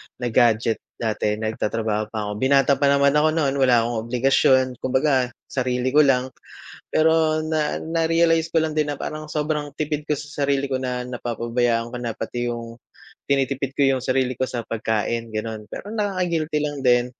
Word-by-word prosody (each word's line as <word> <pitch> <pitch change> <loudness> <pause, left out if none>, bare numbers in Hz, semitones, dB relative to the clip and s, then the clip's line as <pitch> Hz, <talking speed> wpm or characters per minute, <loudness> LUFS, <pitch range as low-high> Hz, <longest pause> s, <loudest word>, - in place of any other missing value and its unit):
na 120 -2 -3
gadget 115 -1 +3 0.2
dati 105 -2 -1
nagtatrabaho 110 0 -2
pa 110 -1 -4
ako. 105 - -4
Binata 140 +1 +3
pa 140 - +3
naman 140 0 +4
ako 155 +2 +2
no'n, 145 -4 +1
wala 125 -3 +4
akong 115 -1 -3
obligasyon, 130 +1 +3
kumbaga 130 0 +1 0.2
sarili 125 0 -1
ko 150 - +4
lang. 130 -3 +3 0.6
Pero 160 0 +3
na 155 -1 0
narealize 165 0 +1
ko 165 - +2
lang 160 -1 0
din 150 -1 0
na 145 - -5
parang 155 0 -6
sobrang 150 -1 -2
tipid 150 -1 -2
ko 145 - +1
sa 145 -1 -6
sarili 140 0 +1
ko, 130 -1 -2
na 125 -1 -3
napapabayaan 120 -1 -1
ko - - -3
na. 120 - -2
Pati 120 +2 -3
yung 115 -1 -6 0.5
tinitipid 135 -1 0
ko 140 - -2 0.2
yung 125 - -7
sarili 130 -1 0
ko 130 - 0
sa 120 -2 -4
pagkain, 115 0 -2
gano'n. 110 0 -4
Pero 205 - -7
nakaka-guilty 180 -8 -1
lang 145 -1 -3
din. 120 0 +4
130 Hz, 175 wpm, -23 LUFS, 120-150 Hz, 0.6 s, naman